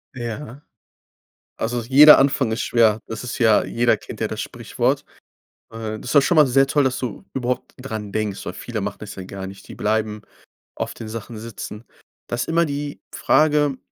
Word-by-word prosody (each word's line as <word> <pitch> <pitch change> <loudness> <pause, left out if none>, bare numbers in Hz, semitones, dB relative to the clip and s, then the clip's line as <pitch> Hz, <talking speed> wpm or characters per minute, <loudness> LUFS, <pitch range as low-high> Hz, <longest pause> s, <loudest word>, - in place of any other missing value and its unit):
Ja. 125 +3 -6 1.0
Also, 120 +1 -2
jeder 140 +6 +8
Anfang 135 -4 +2
ist 115 - -1
schwer. 110 -2 +3
Das 110 +2 -6
ist 125 - -5
ja 110 -3 +5
jeder 120 +1 +2
kennt - - -10
ja - - +1
das - - -6
Sprichwort. - - -1 0.7
Äh, 110 -1 -5
das - - -12
ist 125 - -3
doch 140 - +8
schon 170 +3 +2
mal 150 -3 +7
sehr 135 +2 +4
toll, 145 0 +2
dass 130 - 0
du 120 -6 -5
überhaupt 125 -1 -3
dran 110 -6 -6
denkst, 105 -2 -3
weil - - -4
viele - - -5
machen - - -4
das - - -8
ja 95 - -7
gar 95 +1 -7
nicht. 95 +1 -12
Die - - -10
bleiben 105 0 -1 0.5
auf - - -4
den 110 - -8
Sachen 115 0 -7
sitzen. 110 0 -8 0.4
Da 120 - -2
ist 120 - -2
immer 170 +1 +3
die 145 0 -5
Frage, 150 -3 +3
120 Hz, 195 wpm, -22 LUFS, 110-135 Hz, 1.0 s, jeder